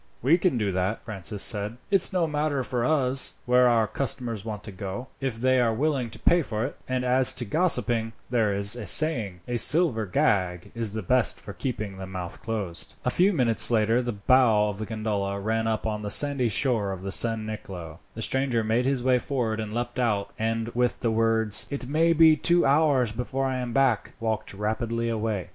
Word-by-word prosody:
"We 160 +8 +3
can 170 -7 +1
do 105 -3 -1
that," 95 +4 -3
Francis 105 -1 -3
said. 105 +1 -1
"It's 195 -2 +4
no 180 -3 +1
matter 150 -3 -2
to 125 - -5
us 135 0 +2
where 125 0 +4
our 115 -2 +2
customers 120 -4 -2
want 105 -2 -7
to 105 - -9
go, 100 +7 -7
if 135 -4 -3
they 130 +1 +2
are 115 -2 +2
willing 135 -2 -1
to - - -11
pay 175 0 +2
for 110 -5 -3
it; 140 - -6
and 130 0 -2
as 125 +1 +4
to 120 - -2
gossiping, 120 - +1
there 115 -4 0
is 100 +2 +2
a 120 -4 -7
saying, 115 - +3
'A 120 -1 -2
silver 130 - +5
gag 90 -1 -1
is 115 -3 -4
the 110 -1 -4
best 125 +6 +1
for 100 - -10
keeping 105 -6 -5
the 95 - -7
mouth 90 -2 -7
closed.'" 100 -7 -4
A 125 - +1
few 185 +8 +3
minutes 125 - +3
later 115 +1 +2
the 120 -1 -3
bow 110 0 +2
of 100 -1 -7
the 110 - -5
gondola 105 -3 -3
ran 110 +2 -2
up 110 -1 -2
on 105 -1 -3
the 105 - -5
sandy 140 0 +3
shore 110 -2 0
of 95 +1 -4
San 115 -1 +2
Nicolo. 90 -6 -8
The 115 - -4
stranger 130 -3 0
made 115 +3 0
his 135 -2 -1
way 130 -1 +2
forward 120 -5 -3
and 110 -1 -5
leapt 120 +2 -4
out, 105 -5 -1
and 115 +1 -2
with 125 +1 -1
the 115 - 0
words, 110 -2 +2
"It 140 -3 -5
may 165 +4 +2
be 160 -1 +6
two 170 +3 +2
hours 140 -5 +2
before 125 +4 -3
I 130 -1 -2
am 125 -1 -4
back," 125 -3 0
walked 110 -3 -3
rapidly 115 +3 -2
away. 110 -5 -3
115 Hz, 205 wpm, -25 LUFS, 105-130 Hz, -, be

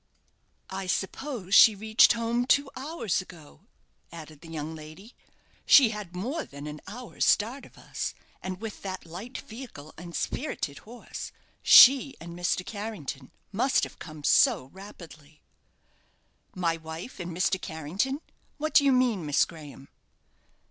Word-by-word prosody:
"I 190 0 -4
suppose 195 +2 -3
she 220 0 +8
reached 220 +3 +5
home 235 +1 -1
two 280 0 +3
hours 265 - -2
ago," 160 - -15 0.4
added 155 -3 -11
the 165 - -12
young 160 0 -5
lady. 160 +9 -12 0.5
"She 265 -5 +7
had 210 -5 -7
more 260 - -3
than 140 +1 -10
an 150 0 -7
hour's 240 +3 -5
start 240 +6 +1
of - - -23
us; - - -5 0.3
and 185 -1 -5
with 220 -1 -7
that 190 -2 -6
light 190 +10 -8
vehicle 220 - -10
and 175 0 -9
spirited 145 - -3
horse 240 +1 -8 0.3
she 270 +1 +8
and 170 +1 -9
Mr. 175 +1 -1
Carrington 200 - -6 0.2
must 245 +6 +2
have - - -6
come 155 -3 -10
so 225 - +3
rapidly." 160 -6 -13 1.1
"My 170 -3 0
wife 160 +8 -9
and 175 -1 -5
Mr. 185 +2 0
Carrington! 185 - -3 0.4
What 310 +1 -3
do 285 - +7
you 280 - +4
mean, 250 -8 +2
Miss 145 -2 +3
Graham?" 145 -4 -12
190 Hz, 140 wpm, -27 LUFS, 160-240 Hz, 1.1 s, she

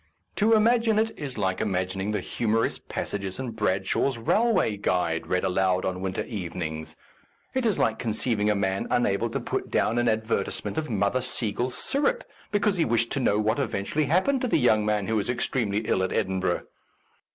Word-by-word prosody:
To 220 +2 +4
im 215 0 +4
agine 230 -2 +3
it 225 0 +1
is 135 -4 -5
like 95 -3 0
imagining 95 -1 -1
the 105 - -1
humorous 115 -1 0
passages 100 -2 -4
in 130 -2 -4
Bradshaw's 105 +4 0
Railway 185 - +2
Guide 90 -4 0
read 90 - 0
aloud 95 0 +1
on 90 0 -2
winter 95 0 -2
evenings. 85 -6 -5 0.6
It 260 -2 +1
is 210 - +1
like - - +1
conceiving 110 -2 0
a 105 - +3
man 95 -1 -1
unable 120 -5 +1
to - - -2
put - - -3
down 115 +2 +1
an 120 -1 +2
advertisement 110 +5 -1
of 155 - -5
Mother 105 +3 +1
Seigel's 125 0 -1
Syrup 385 - +1 0.3
be 205 - +3
cause 200 -1 +2
he 170 - +3
wished 115 -1 +1
to 140 - 0
know 105 -5 +2
what 110 +4 +1
eventually 135 +4 -1
happened 190 - +2
to 255 - 0
the - - +2
young 110 -6 +3
man 105 -2 +1
who 110 +2 0
was 105 +3 -1
ex 125 0 0
tremely 110 -4 -1
ill - - +2
at 95 - -1
Edinburgh. 95 -2 0
110 Hz, 190 wpm, -26 LUFS, 95-135 Hz, 0.6 s, To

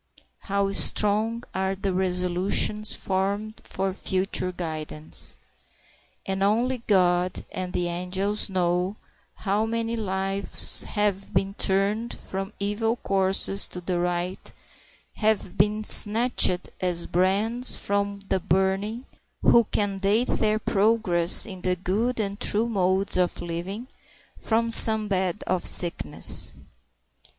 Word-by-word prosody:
How 200 0 -2
strong 215 +3 +1
are 190 0 -2
the 195 0 -3
resolutions 185 +3 0
formed 200 +3 -3
for 190 0 -4
future 185 -1 -2
guidance! 155 -3 -1 0.9
And 190 0 -3
only 235 +6 0
God 180 -2 +1
and 185 -1 -5
the 175 -1 -2
angels 185 +5 -3
know 180 +1 -1 0.4
how 210 +2 -2
many 230 0 -3
lives 195 -2 +2
have 205 -2 -2
been 195 0 0
turned 205 +4 -1
from 195 +2 -6
evil 210 +3 -1
courses 195 -2 +2
to 180 - -8
the 180 0 -3
right, 175 +1 -4 0.7
have 215 -4 -1
been 210 +2 0
snatched 215 -4 +4
as 175 -2 -1
brands 205 +8 +1
from 200 0 -3
the 190 - 0
burning, 190 +7 -1 0.4
who 235 -1 +5
can 200 -1 -3
date 210 +5 0
their 215 0 0
progress 200 -5 +3
in 190 -4 -10
the 180 0 -1
good 210 +7 -2
and 200 -1 -3
true 220 +3 +1
modes 190 -3 -1
of 180 -1 -1
living 180 +8 -6 0.5
from 230 +1 -1
some 220 -2 +7
bed 190 0 -2
of 185 -2 -2
sickness. 95 - +3
195 Hz, 120 wpm, -24 LUFS, 185-215 Hz, 0.9 s, some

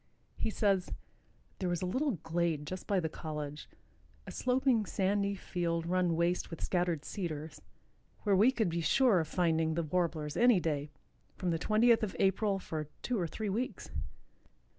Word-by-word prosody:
He - - -1
says: 200 -4 +1 0.7
"There 185 - -1
was 175 0 -1
a - - +1
little 260 +9 0
glade 160 -2 0
just 185 +4 -6
by 200 -2 +2
the 165 - -1
college, 150 -2 -6 0.6
a - - -7
sloping 250 -4 +2
sandy 200 +1 +1
field 170 -3 -2
run 180 -1 +1
waste 170 +2 0
with 165 - -7
scattered 175 -4 0
cedars, 160 -5 -5 0.6
where 205 -2 +3
we 215 +7 +6
could 220 -8 0
be 170 0 -1
sure 225 - +4
of 160 - -1
finding 160 -2 +1
the 170 - 0
Warblers 160 -2 -1
any 240 -4 +5
day, 150 -3 -2 0.5
from 180 -2 -1
the 165 - 0
twentieth 225 +5 +4
of 215 -4 -2
April, 195 +1 +2
for 155 -5 -5 0.2
two 245 -4 0
or 175 - 0
three 215 +5 -4
weeks. 235 +6 -3
180 Hz, 165 wpm, -32 LUFS, 165-205 Hz, 0.7 s, we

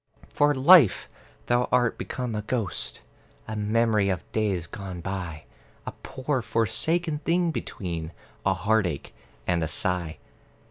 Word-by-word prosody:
For, 145 0 +3
Life, 135 - +6 0.4
thou 120 0 +1
art 120 -2 +2
become 125 -3 -4
a 105 - -2
ghost, 110 -3 -2 0.5
A 110 - -4
memory 105 -1 +2
of 95 -2 -1
days 100 -6 0
gone 95 -2 -7
by, 90 -3 -5 0.4
A - - -4
poor 130 0 -2
forsaken 150 +9 0
thing 170 +1 +1
between 85 - -5 0.3
A 95 -1 +2
heartache 95 -5 0 0.3
and 85 -2 +1
a - - 0
sigh. 85 0 -1
105 Hz, 130 wpm, -26 LUFS, 90-125 Hz, 0.5 s, Life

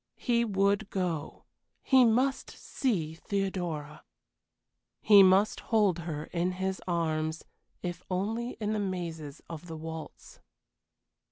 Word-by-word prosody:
He 235 -1 +1
would 200 -1 +1
go 175 -5 -3 0.4
he 260 -2 +6
must 255 +4 +1
see 180 - -2
Theodora. 175 -5 -3 1.0
He 205 -2 +7
must 190 +2 +5
hold 205 -6 +2
her 155 -3 -4
in 180 +1 0
his 190 +1 -3
arms, 160 -2 -1 0.4
if 175 -1 -4
only 220 +6 -2
in 215 -1 -1
the 215 - -1
mazes 170 -7 -4
of 165 +1 -8
the 165 -1 -6
waltz. 160 0 -8
185 Hz, 115 wpm, -29 LUFS, 165-210 Hz, 1.0 s, He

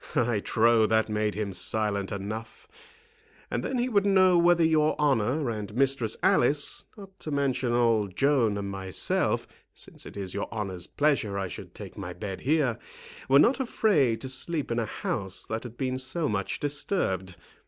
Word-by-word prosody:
I 120 -5 +2
trow 115 +1 +3
that 110 +1 +2
made 105 0 -1
him 105 -2 -3
silent 100 -1 -1
enough. 110 - -6 0.8
And - - -1
then 260 - -2
he 245 +1 +1
would 205 -5 +2
know 190 -2 +5
whether 170 0 +4
your 155 -1 +2
honour 140 0 +1
and 105 -2 -5
Mistress 135 -4 +1
Alice, 145 +4 +2
not 195 -2 -13
to - - -6
mention 135 -4 0
old 115 -5 +2
Joan 130 -7 +2
and 100 -1 -4
myself, 95 -1 -1 0.3
since - - -9
it - - -10
is 95 -2 -4
your 100 - -4
honour's 95 -6 -5
pleasure 140 -9 +1
I 95 -1 -2
should 90 - -9
take - - -9
my - - -5
bed 95 -2 -6
here, 140 -5 +1 0.5
were 135 - +7
not 240 - +5
afraid 180 - +2
to 130 - -4
sleep 145 +2 -1
in 115 - 0
a 115 - -1
house 95 -2 -4
that 110 0 -3
had 120 -1 -10
been 130 -1 -2
so 130 +5 -1
much 100 -4 -2
disturbed. 140 - -1
120 Hz, 175 wpm, -27 LUFS, 105-150 Hz, 0.8 s, were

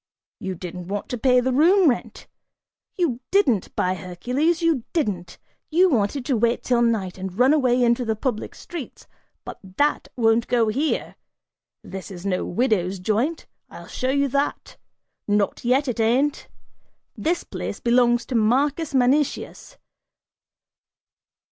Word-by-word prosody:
You 190 -1 -4
didn't 180 0 -8
want 200 +1 -4
to 245 - -3
pay 250 0 +4
the 255 +1 0
room 350 +7 +5
rent, 250 - -2 0.7
you 310 -10 0
didn't, 270 - +1
by 185 - +1
Hercules, 250 - -1
you 320 -8 +2
didn't; 195 - -2 0.3
you 355 +3 +4
wanted 245 +2 0
to 265 - +1
wait 235 +1 +1
till 245 -2 +2
night 210 -6 0
and 190 0 -6
run 255 +4 +5
away 255 -4 +2
into 235 +1 +2
the 220 -2 -1
public 220 -1 -3
streets, 335 -8 -9 0.4
but - - -8 0.2
that 295 +1 +1
won't 230 -1 +2
go 235 -3 +2
here! 280 +8 -2 0.7
This 190 +1 -8
is 185 -1 -9
no 185 -2 0
widow's 195 -3 0
joint, 220 - -1 0.2
I'll - - -11
show 255 - -3
you 280 +1 +2
that; 280 +3 -2 0.5
not 205 -1 0
yet 260 +4 +2
it 245 -2 -3
ain't! 255 +6 +1 0.7
This 340 +2 -1
place - - -6
belongs 240 -1 +3
to - - -6
Marcus 275 +7 +1
Manicius!" 265 +3 0
245 Hz, 140 wpm, -23 LUFS, 210-280 Hz, 0.7 s, room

